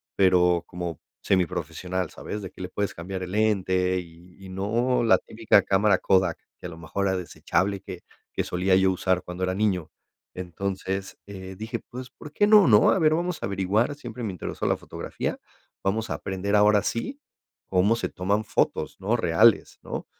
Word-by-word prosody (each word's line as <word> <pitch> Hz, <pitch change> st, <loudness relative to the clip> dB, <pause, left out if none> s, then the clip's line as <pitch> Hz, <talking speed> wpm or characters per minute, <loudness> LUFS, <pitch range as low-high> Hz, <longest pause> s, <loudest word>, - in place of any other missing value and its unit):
pero 90 Hz, -2 st, +4 dB
como 85 Hz, -4 st, -5 dB, 0.2 s
semiprofesional, 90 Hz, -1 st, -1 dB
¿sabes?, 105 Hz, 0 st, -6 dB
de 95 Hz, -, -7 dB
que -, -, -12 dB
le 90 Hz, -, -5 dB
puedes 100 Hz, +1 st, -2 dB
cambiar 95 Hz, +2 st, -6 dB
el 90 Hz, -, -6 dB
lente 95 Hz, -4 st, +1 dB
y 85 Hz, +1 st, -13 dB
y -, -, -9 dB
no 115 Hz, +7 st, 0 dB
la 115 Hz, -, +5 dB
típica 110 Hz, -2 st, +2 dB
cámara 100 Hz, 0 st, +3 dB
Kodak, 95 Hz, -4 st, +2 dB, 0.2 s
que -, -, -7 dB
a -, -, -7 dB
lo 80 Hz, -, -10 dB
mejor 85 Hz, +5 st, -2 dB
era 95 Hz, 0 st, +1 dB
desechable, 90 Hz, +2 st, -1 dB
que 95 Hz, -3 st, -9 dB, 0.3 s
que -, -, -1 dB
solía 95 Hz, +1 st, +1 dB
yo 95 Hz, 0 st, +4 dB
usar 95 Hz, 0 st, 0 dB
cuando 90 Hz, +1 st, -6 dB
era 95 Hz, 0 st, 0 dB
niño. 95 Hz, -6 st, 0 dB, 0.5 s
Entonces, 95 Hz, +2 st, -4 dB
eh, 95 Hz, -1 st, -8 dB
dije: 115 Hz, +3 st, -4 dB
"Pues, 125 Hz, 0 st, -8 dB
¿por 150 Hz, -, -12 dB
qué 205 Hz, -, +3 dB
no?", 210 Hz, -3 st, +7 dB
¿no?, 105 Hz, -3 st, +6 dB
a -, -, +2 dB
ver, 155 Hz, -2 st, +4 dB
vamos 175 Hz, 0 st, -2 dB
a -, -, 0 dB
averiguar, 100 Hz, +7 st, 0 dB
siempre 125 Hz, -4 st, -8 dB
me 105 Hz, -, -2 dB
interesó 90 Hz, -, -5 dB
la -, -, +2 dB
fotografía. -, -, -5 dB, 0.4 s
Vamos 110 Hz, +3 st, -1 dB
a -, -, 0 dB
aprender 95 Hz, +2 st, -2 dB
ahora 105 Hz, 0 st, +5 dB
sí 260 Hz, -, -3 dB, 0.5 s
cómo 95 Hz, +4 st, +3 dB
se 115 Hz, -, -3 dB
toman 100 Hz, +4 st, -1 dB
fotos, -, -, -1 dB
¿no?, 100 Hz, +5 st, +1 dB
reales, 105 Hz, +3 st, +3 dB
¿no?, -, -, -5 dB
95 Hz, 185 wpm, -25 LUFS, 90-110 Hz, 0.5 s, no